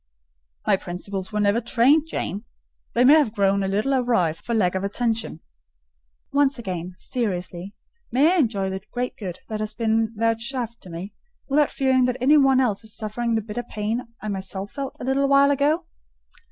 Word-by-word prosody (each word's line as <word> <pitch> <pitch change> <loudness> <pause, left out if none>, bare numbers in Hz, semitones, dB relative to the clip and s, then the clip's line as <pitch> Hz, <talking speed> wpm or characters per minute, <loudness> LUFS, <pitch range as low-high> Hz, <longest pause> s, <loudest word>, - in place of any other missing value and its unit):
"My - - +4
principles 190 +2 -5
were 210 - -1
never 205 +3 +2
trained, 260 +7 +3
Jane: 205 - -4 0.5
they 245 +2 +4
may 280 - +8
have 290 -8 +3
grown 200 0 +2
a 195 - 0
little 210 +8 0
awry 240 -11 +2
for 235 +8 -4
want 180 -4 +2
of 190 0 -2
attention." 220 -3 -1 0.9
"Once 280 -1 +3
again, 180 -5 -5
seriously; 195 -5 -3 0.4
may 285 +8 +4
I - - +2
enjoy 210 - +1
the 190 0 -4
great 250 0 -3
good 185 -5 -7
that 215 -1 -4
has 215 0 -4
been 225 -1 +1
vouchsafed 230 +2 -1
to 185 - -12
me, 175 +4 -7 0.3
without 290 +1 +3
fearing 260 -2 +2
that 250 0 -1
any 270 +5 +5
one 270 -2 +5
else 225 -5 +1
is 220 -1 -5
suffering 230 +1 -2
the 220 - 0
bitter 225 +3 -4
pain 225 +1 -3
I 215 - -7
myself 195 0 -5
felt 275 -1 -5
a 265 +2 +1
while 280 +1 +5
ago?" 295 +5 +1
225 Hz, 180 wpm, -23 LUFS, 200-260 Hz, 0.9 s, may